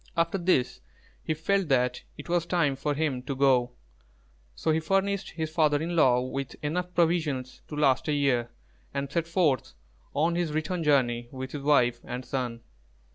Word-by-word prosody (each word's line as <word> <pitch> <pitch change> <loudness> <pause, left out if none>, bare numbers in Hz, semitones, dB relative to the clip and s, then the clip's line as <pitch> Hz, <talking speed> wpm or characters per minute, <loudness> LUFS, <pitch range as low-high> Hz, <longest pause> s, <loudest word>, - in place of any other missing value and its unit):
After 170 +3 +1
this, 170 -8 +1 0.4
he 155 - -1
felt 195 +4 0
that 125 -2 +1 0.2
it 145 - -9
was 170 -1 0
time 155 -6 +1
for 145 +2 -2
him 145 -4 -1
to 135 +2 -4
go; 130 -2 +3 0.8
so 160 - 0
he 155 - +2
furnished 195 +4 0
his 160 -1 -4
father 155 -3 +3
in 170 +3 -3
law 125 -6 +4
with 130 0 -4
enough 180 +4 -2
provisions 155 -7 0
to 150 - -7
last 135 -2 +2
a 150 - +1
year, 130 -5 +1 0.5
and 140 0 -2
set 165 +1 -1
forth 160 - +1 0.4
on 160 +4 +2
his 170 -3 -1
return 165 +3 -1
journey 120 -5 +2
with 130 0 -6
his 145 - -5
wife 125 -5 +3
and 125 +1 -6
son. 125 -3 -3
150 Hz, 175 wpm, -27 LUFS, 130-165 Hz, 0.8 s, law